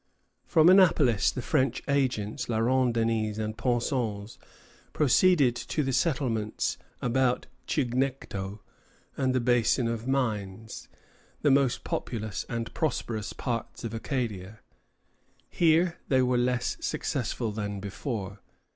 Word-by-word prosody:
From 160 Hz, 0 st, +5 dB
Annapolis 165 Hz, -, +5 dB
the 125 Hz, -, -4 dB
French 135 Hz, -5 st, 0 dB
agents, 130 Hz, -5 st, -1 dB
La 115 Hz, -, 0 dB
Ronde 125 Hz, +1 st, +2 dB
Denys 110 Hz, -2 st, 0 dB
and 110 Hz, 0 st, -3 dB
Pensens, 115 Hz, -4 st, -2 dB, 0.5 s
proceeded 150 Hz, -2 st, +4 dB
to 150 Hz, +4 st, -2 dB
the 135 Hz, -1 st, -1 dB
settlements 125 Hz, -7 st, 0 dB, 0.2 s
about 125 Hz, +1 st, +1 dB, 0.2 s
Chignecto 125 Hz, -7 st, -2 dB, 0.5 s
and 130 Hz, -2 st, 0 dB
the -, -, +3 dB
Basin 120 Hz, 0 st, +2 dB
of 115 Hz, +1 st, -3 dB
Mines, 110 Hz, -5 st, -2 dB, 0.6 s
the 145 Hz, -, +5 dB
most 135 Hz, -2 st, +2 dB
populous 110 Hz, -3 st, -4 dB
and 115 Hz, -1 st, -4 dB
prosperous 120 Hz, -8 st, -2 dB
parts 115 Hz, -3 st, -4 dB
of 115 Hz, -1 st, -4 dB
Acadia. 110 Hz, -4 st, -4 dB, 0.9 s
Here 170 Hz, +1 st, +3 dB
they 130 Hz, -1 st, +3 dB
were 125 Hz, 0 st, +1 dB
less 125 Hz, 0 st, 0 dB
successful 115 Hz, -2 st, -2 dB
than 100 Hz, -1 st, -4 dB
before. 100 Hz, 0 st, -5 dB
120 Hz, 115 wpm, -28 LUFS, 110-135 Hz, 0.9 s, From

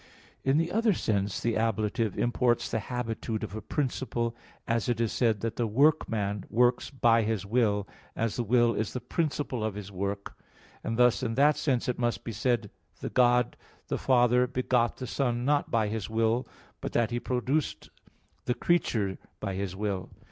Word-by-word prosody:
In 135 Hz, +2 st, +3 dB
the 165 Hz, +1 st, +1 dB
other 225 Hz, 0 st, +3 dB
sense, 100 Hz, -, -1 dB
the 115 Hz, -1 st, 0 dB
ablative 110 Hz, -1 st, 0 dB
imports 120 Hz, 0 st, +1 dB
the 115 Hz, -, 0 dB
habitude 115 Hz, -1 st, -3 dB
of 110 Hz, -, -5 dB
a 110 Hz, -, -4 dB
principle 120 Hz, -1 st, -2 dB, 0.3 s
as 115 Hz, +1 st, 0 dB
it 120 Hz, -2 st, 0 dB
is 115 Hz, -2 st, +1 dB
said 110 Hz, -5 st, +1 dB
that 115 Hz, 0 st, -3 dB
the 120 Hz, -, +1 dB
workman 110 Hz, -, +2 dB
works 120 Hz, +2 st, +2 dB
by 120 Hz, -4 st, +3 dB
his 110 Hz, -2 st, -1 dB
will, 105 Hz, -2 st, +1 dB, 0.3 s
as 115 Hz, -2 st, -1 dB
the -, -, 0 dB
will 120 Hz, +1 st, +3 dB
is 110 Hz, -, -2 dB
the 125 Hz, -, -2 dB
principle 135 Hz, -2 st, -2 dB
of 110 Hz, -2 st, -2 dB
his 100 Hz, -1 st, -7 dB
work; 100 Hz, +1 st, -4 dB, 0.5 s
and 115 Hz, -, -2 dB
thus 125 Hz, -1 st, +4 dB
in 115 Hz, -, -1 dB
that 145 Hz, +3 st, +5 dB
sense 130 Hz, -5 st, 0 dB
it 125 Hz, -, -1 dB
must 120 Hz, -1 st, 0 dB
be 115 Hz, -, -4 dB
said 115 Hz, -1 st, 0 dB, 0.3 s
the -, -, -5 dB
God 125 Hz, -1 st, +3 dB, 0.3 s
the -, -, 0 dB
Father 125 Hz, -1 st, +4 dB
begot 125 Hz, -2 st, +1 dB
the 130 Hz, -, -5 dB
Son, 120 Hz, -2 st, -1 dB
not 145 Hz, +1 st, +2 dB
by 110 Hz, -2 st, +2 dB
His 105 Hz, -1 st, -3 dB
will; 115 Hz, +3 st, +1 dB, 0.3 s
but -, -, -4 dB
that 120 Hz, 0 st, +2 dB
He 120 Hz, -, -1 dB
produced 130 Hz, +5 st, -1 dB, 0.5 s
the 125 Hz, -, 0 dB
creature 110 Hz, -, +1 dB, 0.2 s
by 100 Hz, -2 st, -3 dB
His 95 Hz, -1 st, -3 dB
will. 100 Hz, -2 st, -3 dB
115 Hz, 180 wpm, -29 LUFS, 110-125 Hz, 0.5 s, that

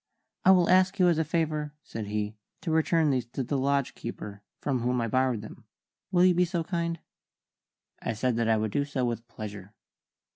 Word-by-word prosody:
"I -, -, +5 dB
will 180 Hz, -2 st, +6 dB
ask 185 Hz, +1 st, +4 dB
you 180 Hz, -1 st, +5 dB
as 165 Hz, -2 st, +2 dB
a -, -, +3 dB
favour," 155 Hz, -2 st, -1 dB
said 110 Hz, -2 st, -6 dB
he, 105 Hz, 0 st, -2 dB, 0.3 s
"to 165 Hz, -, -2 dB
return 160 Hz, -1 st, +3 dB
these 125 Hz, -3 st, 0 dB
to 135 Hz, -, -1 dB
the 140 Hz, -, -2 dB
lodge 140 Hz, 0 st, +1 dB
keeper, 105 Hz, -3 st, -7 dB, 0.2 s
from 135 Hz, -3 st, -1 dB
whom 125 Hz, +1 st, 0 dB
I 115 Hz, -, 0 dB
borrowed 130 Hz, -1 st, +1 dB
them. 110 Hz, -, -11 dB, 0.5 s
Will 180 Hz, -1 st, +5 dB
you 185 Hz, -, +6 dB
be 180 Hz, +1 st, +3 dB
so 175 Hz, -1 st, -1 dB
kind?" 170 Hz, -1 st, -2 dB, 1.0 s
I 115 Hz, -, -2 dB
said 125 Hz, +2 st, 0 dB
that 115 Hz, -1 st, +1 dB
I 110 Hz, -, +4 dB
would 110 Hz, -1 st, -1 dB
do 140 Hz, -, +1 dB
so 140 Hz, -3 st, -2 dB
with 120 Hz, -1 st, -3 dB
pleasure. 105 Hz, -3 st, -8 dB
135 Hz, 205 wpm, -28 LUFS, 115-165 Hz, 1.0 s, will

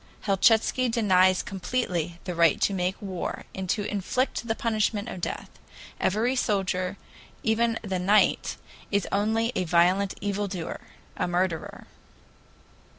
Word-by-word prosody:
Helchitsky 225 Hz, +5 st, +3 dB
denies 185 Hz, -5 st, +3 dB
completely 180 Hz, -5 st, -2 dB
the 180 Hz, -, -4 dB
right 170 Hz, -2 st, +4 dB
to 200 Hz, -, +2 dB
make 185 Hz, 0 st, -1 dB
war 190 Hz, -4 st, -4 dB
and 190 Hz, -1 st, -5 dB
to 205 Hz, -, +1 dB
inflict 235 Hz, +5 st, -1 dB
the 225 Hz, -, 0 dB
punishment 215 Hz, -2 st, 0 dB
of 180 Hz, -, -7 dB
death; -, -, -4 dB, 0.5 s
every 225 Hz, +7 st, +1 dB
soldier, 195 Hz, -5 st, 0 dB, 0.5 s
even 230 Hz, -1 st, +2 dB
the 190 Hz, -3 st, -2 dB
'knight,' 200 Hz, +4 st, +3 dB, 0.3 s
is 200 Hz, -1 st, 0 dB
only 220 Hz, +3 st, +1 dB
a 185 Hz, -, +1 dB
violent 180 Hz, +3 st, +3 dB
evil 205 Hz, 0 st, -1 dB
doer 180 Hz, -4 st, -5 dB, 0.4 s
a -, -, 0 dB
murderer." 175 Hz, -1 st, -2 dB
200 Hz, 130 wpm, -26 LUFS, 180-220 Hz, 0.5 s, right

